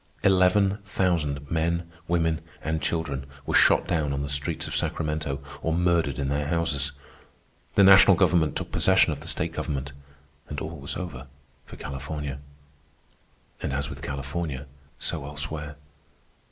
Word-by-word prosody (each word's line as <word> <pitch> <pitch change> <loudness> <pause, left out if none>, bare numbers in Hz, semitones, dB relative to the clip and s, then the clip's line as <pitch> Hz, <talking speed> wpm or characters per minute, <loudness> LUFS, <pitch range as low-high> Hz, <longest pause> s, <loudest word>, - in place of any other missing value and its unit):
Eleven 95 +1 +4
thousand 80 -8 -1
men, 85 +1 0 0.2
women, 80 -1 +1 0.2
and 80 0 -1
children 75 -5 -1 0.2
were - - -2
shot - - +5
down 80 -5 0
on 70 +1 -2
the 70 - -4
streets 70 +2 0
of - - -3
Sacramento 75 -3 -1 0.2
or 80 0 0
murdered 85 -6 +2
in 70 - -1
their 70 +1 -1
houses. 75 -4 0 0.8
The 100 - +6
national 95 0 +8
government 85 -4 +3
took - - -3
possession 95 -3 +4
of 70 - -7
the 80 - -10
state 85 -1 0
government, 70 -4 -3 0.6
and 75 - -4
all 80 0 -6
was 70 - -4
over 75 -8 -6 0.4
for - - -10
California. 70 0 -5 1.2
And - - -2
as 70 -1 -2
with - - -8
California, 70 +1 -4 0.3
so - - -2
elsewhere. 75 +1 -5
80 Hz, 145 wpm, -26 LUFS, 70-85 Hz, 1.2 s, national